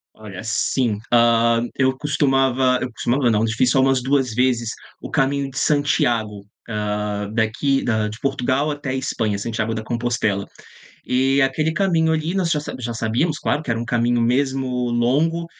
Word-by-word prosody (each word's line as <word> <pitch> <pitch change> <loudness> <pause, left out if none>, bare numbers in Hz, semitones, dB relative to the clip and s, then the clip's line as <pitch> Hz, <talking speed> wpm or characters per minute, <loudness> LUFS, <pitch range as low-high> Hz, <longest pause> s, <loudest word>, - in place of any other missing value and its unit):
Olha 105 -4 -9
assim, 115 0 0
ah, 115 -1 +4
eu 130 -1 +1
costumava 135 -3 +2
eu 130 - -3
costumava 120 +2 +1
não, 105 -2 +2
eu 115 - +1
fiz 115 +3 +1
só 135 - +3
umas 135 -1 +2
2 135 -3 +1
vezes 120 -2 +1 0.3
o - - -8
caminho 140 -1 0
de 130 - -6
Santiago, 120 -9 +1 0.2
ah, 105 -1 -3
daqui 120 +5 0
da 110 -2 0
de 110 +1 -9
Portugal 135 +2 0
até 145 -3 -4
Espanha, 110 -5 -2
Santiago 110 +1 -2
da 110 - -4
Compostela. 115 -3 -1 0.6
E 135 +2 +2
aquele 150 +4 +1
caminho 165 -3 +1
ali 160 +2 -1
nós 185 -4 0
já 155 - +2
sa 150 - -6
já 120 -1 -3
sabíamos, 115 +9 -1
claro, 150 - -1
que 140 - -5
era 115 - 0
um - - -3
caminho 120 0 +1
mesmo 130 +3 +1 0.2
longo, 145 +8 +1
125 Hz, 170 wpm, -21 LUFS, 115-140 Hz, 0.6 s, ah